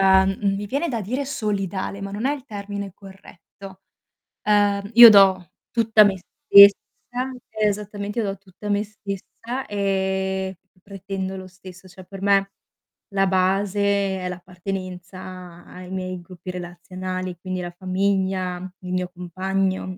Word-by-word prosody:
uhm, 190 0 +4 0.2
mi 205 +1 -4
viene 285 +9 -1
da 235 -6 -2
dire 250 +8 -2
solidale, 200 -6 -3
ma 195 0 -5
non 210 +5 -3
è 280 - +2
il 275 -3 -10
termine 200 -4 -6
corretto. 195 0 -14 0.6
Uhm, 205 -1 +2
io 235 0 +12
do 190 -4 +5 0.2
tutta 225 -2 +5
me 200 -2 +2
stessa 200 +2 +7 0.7
Eh, 215 -1 0
esattamente 205 +1 -3
io 220 - 0
do 195 0 -3
tutta 195 +2 -10
me 205 0 +1
stessa, 215 +4 -6
e 190 -1 -1 0.2
pretendo 195 0 -5
lo 185 0 -8
stesso, 185 0 -14
cioè, 185 0 -14
per 195 +1 -10
me 195 0 +3 0.6
la 195 0 +2
base 190 +2 +1 0.4
è 180 - -4
l'appartenenza 180 -1 -7
ai 180 0 -11
miei 185 -1 -4
gruppi 180 +1 -11
relazionali, 185 +1 -6
quindi 185 0 -4
la 175 0 -5
famiglia, 185 0 -1 0.2
il 180 -1 -7
mio 180 -1 -1
compagno, 185 +1 -2
195 Hz, 140 wpm, -23 LUFS, 185-200 Hz, 0.7 s, io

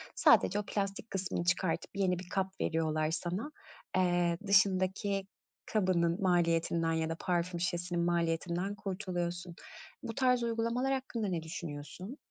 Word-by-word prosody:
Sadece 205 - +5
o - - -2
plastik 200 +2 -2
kısmını 190 -2 -2
çıkartıp 175 -1 0
yeni 185 -3 +1
bir 180 -1 -9
kap 190 0 -2
veriyorlar 155 -1 +1
sana. 180 - -3 0.5
Eee, 175 -2 +2
dışındaki 195 0 +3 0.4
kabının 185 -4 +1
maliyetinden 170 -2 +2
ya 160 0 0
da 165 - -2
parfüm 175 -1 0
şişesinin 175 0 -1
maliyetinden 170 +3 0
kurtuluyorsun. 180 -3 -3 0.5
Bu 225 - -5
tarz 250 -2 +3
uygulamalar 235 +3 0
hakkında 250 -5 -2
ne 170 -4 -2
düşünüyorsun? 165 - -7
180 Hz, 125 wpm, -32 LUFS, 170-200 Hz, 0.5 s, Sadece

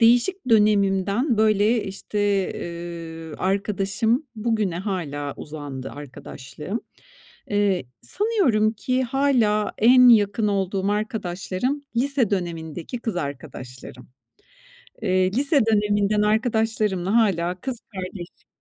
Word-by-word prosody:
değişik 245 +10 +3
dönemimden, 210 +2 +3
böyle, 215 +1 +3
işte, 195 +2 -5 0.4
eee, 170 -2 -7
arkadaşım, 200 +7 0
bugüne 215 -6 0
hâlâ 150 -8 -3
uzandı 145 -3 -7
arkadaşlığım, 145 - -7 0.7
eee, 205 -6 +1 0.2
sanıyorum 350 - +2
ki 255 +4 -1
hâlâ 235 -6 +2
en 250 +3 +7
yakın 210 -1 +4
olduğum 195 0 0
arkadaşlarım 210 +4 -2
lise 260 -2 +1
dönemindeki 170 +2 -4
kız 225 -5 -3
arkadaşlarım. 130 -4 -7 0.9
Eee, 185 -3 +2
lise 275 - +3
döneminden 210 -1 +2
arkadaşlarımla 215 -3 +1
hâlâ 180 -6 +2
kız 255 0 -5 0.2
kardeşim 185 -1 -8
205 Hz, 95 wpm, -23 LUFS, 180-230 Hz, 0.9 s, en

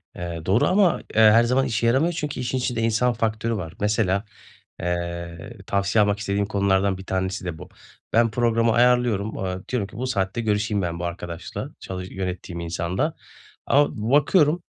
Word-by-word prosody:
Eee, 85 -2 -5
doğru 100 +5 +3
ama, 185 -2 +3 0.2
eee, 110 - +5
her 110 +2 +7
zaman 130 +3 +2
işe 115 +1 0
yaramıyor 140 +9 +2
çünkü 150 -4 -4
işin 125 +1 -1
içinde 125 -2 -1
insan 115 +2 +2
faktörü 115 0 -1
var. 85 -4 -5
Mesela, 105 -1 +1 0.5
eee, 85 +3 -4
tavsiye 100 +2 +2
almak 105 0 0
istediğim 100 -1 -1
konulardan 100 -1 +1
1 95 - -10
tanesi 95 0 -2
de 85 -3 -4
bu. - - -11 0.4
Ben 115 -1 +4
programı 115 -1 +2
ayarlıyorum, 120 -4 +2
aaa, 95 -1 -4
diyorum 115 -6 -1
ki 105 - -13
bu 130 +1 -2
saatte 100 -1 -1
görüşeyim 105 -1 0
ben 85 -1 -3
bu 90 - -3
arkadaşla, 85 0 -6
çalış 95 0 -6
yönettiğim 90 -2 -5
insanla. 85 - -2 0.5
Ama 145 +1 +4 0.2
bakıyorum, 150 +3 +4
105 Hz, 165 wpm, -23 LUFS, 95-120 Hz, 0.5 s, her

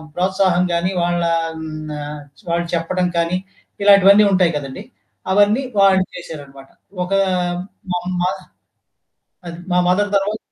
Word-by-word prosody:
ప్రోత్సాహంగానీ, 180 -1 +1
వాళ్ళా 175 -1 0 0.3
హ్మ్. 155 -1 -7
ఆహ్, 150 0 -6 0.3
వాళ్ళు 170 0 -1
చెప్పడం 180 +2 -1
కానీ 170 +2 +1 0.5
ఇలాంటివన్నీ 200 +1 +7
ఉంటాయి 180 -4 +2
కదండీ! 135 -2 -7 0.5
అవన్నీ 205 +6 +3 0.2
వాళ్ళు 190 -1 +5
చేశారనమాట. 140 -5 -10 0.4
ఒక 185 - -4 0.8
మమ్మా 180 0 -1 1.2
అది. 170 0 -8
మా - - +3
మదర్ 205 +3 +2
తర్వాత 205 +2 -2
180 Hz, 110 wpm, -19 LUFS, 165-190 Hz, 1.2 s, ఇలాంటివన్నీ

